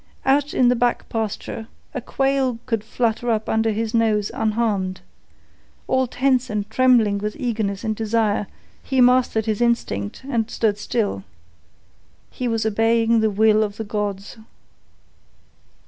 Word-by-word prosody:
Out 285 +2 +2
in 250 - +3
the 250 - +3
back 245 0 0
pasture, 225 0 -4 0.3
a 255 - -3
quail 270 -1 0
could 225 -4 -1
flutter 230 +1 -1
up 220 -1 0
under 220 0 +1
his 220 +1 -2
nose 220 -3 +1
unharmed. 210 -4 -1 0.9
All 260 0 +2
tense 255 0 +1
and 210 -1 -2
trembling 230 -5 +3
with 210 +1 -3
eagerness 215 -6 -2
and 220 -1 -1
desire, 215 -2 0 0.3
he 265 -1 -1
mastered 250 -3 +4
his 220 0 -1
instinct 165 - -1
and 230 -5 -1
stood 210 -4 0
still. 205 - -2 1.1
He 250 - -3
was 225 -1 -1
obeying 225 +1 +2
the 220 0 +2
will 215 +1 +3
of 205 -1 -4
the 225 - -3
gods. 205 -1 -4
225 Hz, 140 wpm, -22 LUFS, 210-245 Hz, 1.1 s, mastered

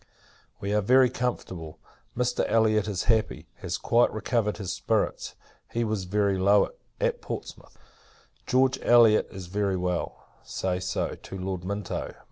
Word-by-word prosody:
We 100 +1 -2
are 105 - +3
very 125 +4 +5
comfortable. 90 -10 -4 0.4
Mr. 125 0 +1
Elliot 110 -2 +3
is 100 -5 -2
happy, 110 -2 +1
has - - -3
quite 120 +1 +3
recovered 110 -1 -1
his 95 -3 -4
spirits; 100 +3 -1 0.4
he 120 - 0
was 105 -4 -2
very 100 0 +1
low, 100 +2 +4 0.3
at - - 0
Portsmouth. - - -8 0.7
George 130 +1 +3
Elliot 115 -3 +5
is 95 -2 -8
very 100 +1 -1
well; 90 -1 -3 0.2
say 90 -1 -2
so, 90 - -2
to 95 - -9
Lord 95 -1 -4
Minto. 100 +1 -4
105 Hz, 140 wpm, -27 LUFS, 95-115 Hz, 0.7 s, very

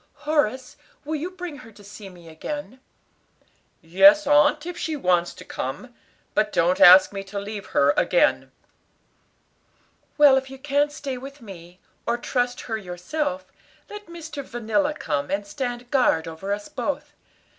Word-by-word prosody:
"Horace, 265 -4 -1 0.3
will 310 +2 -2
you 325 +5 -4
bring 360 -5 -8
her 225 -3 -13
to 205 - -17
see 200 0 -11
me 175 -2 -15
again?" 260 - -7 1.0
"Yes, 295 - +6
aunt, 295 +1 +4
if 355 0 -5
she 315 -1 -3
wants 180 -9 +1
to - - -12
come. 240 - -6 0.4
But 210 0 +1
don't 175 +2 +1
ask 185 +2 +8
me 195 -1 -5
to 195 +1 -8
leave 200 0 -6
her 140 +1 +3
again." - - +2 1.7
"Well, 290 -3 +7
if 265 0 -3
you 270 - -10
can't 290 +1 0
stay 275 -3 -6
with 275 +2 -10
me, 180 -5 -12 0.3
or 235 +1 +1
trust 245 0 -2
her 225 -2 -4
yourself, 270 - -4 0.5
let 415 -1 -9
Mr. 320 -4 -8
Vanilla 240 +5 -1
come 145 - -3
and 200 +1 -2
stand 245 +1 -5
guard 245 - +2
over 165 +5 -6
us 205 0 -3
both. - - -4
245 Hz, 155 wpm, -23 LUFS, 195-290 Hz, 1.7 s, ask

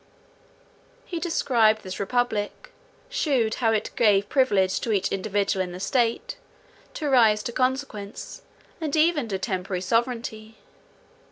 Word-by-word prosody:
He 345 - -4
described 235 -10 +2
this 185 -2 -6
republic; 215 0 -2 0.4
shewed 275 - 0
how 225 -2 +3
it 215 -1 -1
gave 205 -3 +3
privilege 200 -9 +2
to 230 - -2
each 200 -2 +1
individual 195 -1 0
in 180 -1 -7
the 180 - -7
state, 245 - 0 0.6
to 305 - -3
rise 225 -6 +4
to - - -3
consequence, 255 -5 -3 0.4
and 310 -2 -1
even 310 -5 +3
to 195 -3 -2
temporary 185 -2 -3
sovereignty. 225 0 -2
225 Hz, 125 wpm, -25 LUFS, 200-260 Hz, 0.6 s, rise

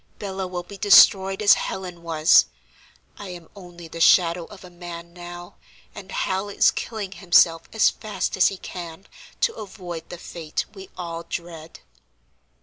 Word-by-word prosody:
Bella 190 -2 -5
will 180 -1 -5
be 195 +2 -12
destroyed 195 -1 +6
as 205 - +8
Helen 180 -2 -4
was; 160 -2 +4 0.7
I 205 - -8
am 175 -2 -10
only 175 -3 -12
the 165 +1 -8
shadow 170 -1 +4
of 195 +1 -14
a 180 - -13
man 170 -1 -9
now, 175 0 -10 0.4
and 195 -2 -11
Hal 190 +2 -2
is 200 - +3
killing 215 -4 -5
himself 175 -3 +3
as 220 - +3
fast 215 -1 -4
as 190 - +5
he 195 - -3
can, 175 0 -9 0.4
to - - +2
avoid 180 - -8
the 175 - -7
fate 165 -2 -5
we 190 -2 -11
all 170 -2 -5
dread." 165 -2 -8
180 Hz, 155 wpm, -23 LUFS, 170-195 Hz, 0.7 s, as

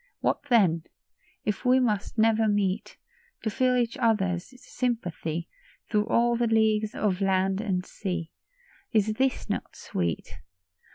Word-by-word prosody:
What - - 0
then? 175 -9 +4 0.6
If 210 +2 -1
we 255 0 +5
must 215 -4 0
never 225 0 +4
meet 205 -1 0 0.2
— 475 0 -35
To 220 - -1
feel 255 +2 +2
each 240 -2 0
other's 195 -5 +1
sympathy 175 -12 -3 0.4
Through 210 0 +2
all 235 0 +3
the 235 0 +1
leagues 220 -1 +2
of 200 -2 0
land 190 0 +2
and 185 -4 -1
sea, 180 -4 -4 0.6
Is 215 -1 +2
this 260 +3 0
not - - -4
sweet 85 -3 -3
215 Hz, 135 wpm, -27 LUFS, 190-235 Hz, 0.6 s, we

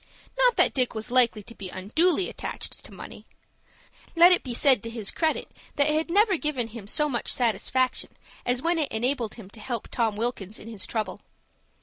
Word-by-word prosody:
Not - - +4
that - - +4
Dick 255 -3 +1
was 220 +2 -4
likely 240 -4 +4
to 230 - -11
be 195 -4 -8
unduly 315 - +1
attached - - -6
to - - -9
money. - - -11 0.9
Let 345 +2 +8
it 360 - +5
be 245 -3 -5
said 265 -4 +5
to 230 - -6
his 225 -3 -4
credit 320 -2 -1 0.2
that 285 - +3
it 300 - +2
had 315 +2 0
never 400 +1 +4
given 275 -7 -2
him 220 -3 -10
so 300 +7 +1
much 245 -5 -2
satisfaction 250 +2 0 0.3
as 245 +2 0
when 340 0 +1
it 300 - 0
enabled 240 0 -1
him 225 -5 -11
to 220 - -11
help 235 +2 -5
Tom 225 -3 0
Wilkins 220 -2 -3
in - - -12
his 220 -4 -6
trouble. 215 -5 -3
245 Hz, 200 wpm, -26 LUFS, 220-300 Hz, 0.9 s, Let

